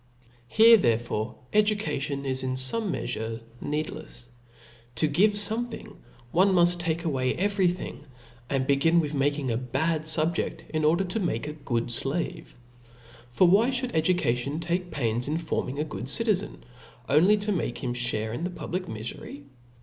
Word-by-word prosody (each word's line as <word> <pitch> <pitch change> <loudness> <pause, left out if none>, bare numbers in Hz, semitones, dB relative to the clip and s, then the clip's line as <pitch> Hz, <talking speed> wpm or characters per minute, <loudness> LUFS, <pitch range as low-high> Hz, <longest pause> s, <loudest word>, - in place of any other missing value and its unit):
Here 225 - +7
therefore 115 - -1 0.2
education 205 -10 0
is 130 -1 -1
in 130 0 -2
fonie 200 +12 0 0.7
meafureneed 150 +1 -2
lefs: 120 - -10 0.7
to 140 - +3
give 190 +9 +3
fomcthing, 220 +4 -2 0.4
one 190 +3 +4
muft 175 -1 +4
take 165 -1 -2
away 130 -5 0
every 195 0 +2
thing; 175 -4 -4 0.4
and 135 -1 0
begin 145 +5 +3
with 155 -2 -1
making 145 -2 0
a 115 - 0
bad 150 +6 -1
fubjedt, 160 +1 0
in 155 -1 -1
order 170 +5 +3
to 190 +4 -1
niake 175 -5 -2
a 150 - -4
good 120 -5 -2
(lave. 145 +1 -4 0.7
For 175 +9 +4
why 205 +7 +4
(hould 255 -1 -2
education 155 -5 +1
take 175 +2 -2
pains 120 -5 -1
in 155 +2 -1
forming 160 -4 -3
a 150 - 0
gogd 140 -5 -6
citizen, 210 +4 +1 0.4
only 180 +9 +5
to 210 +1 -2
make 170 -10 -3
him 120 - -1
(hare 115 -3 0
in 140 - -4
the 180 - -1
pub 175 - -8
lic 185 0 -2
mifery 115 +5 -7
155 Hz, 155 wpm, -26 LUFS, 130-185 Hz, 0.7 s, Here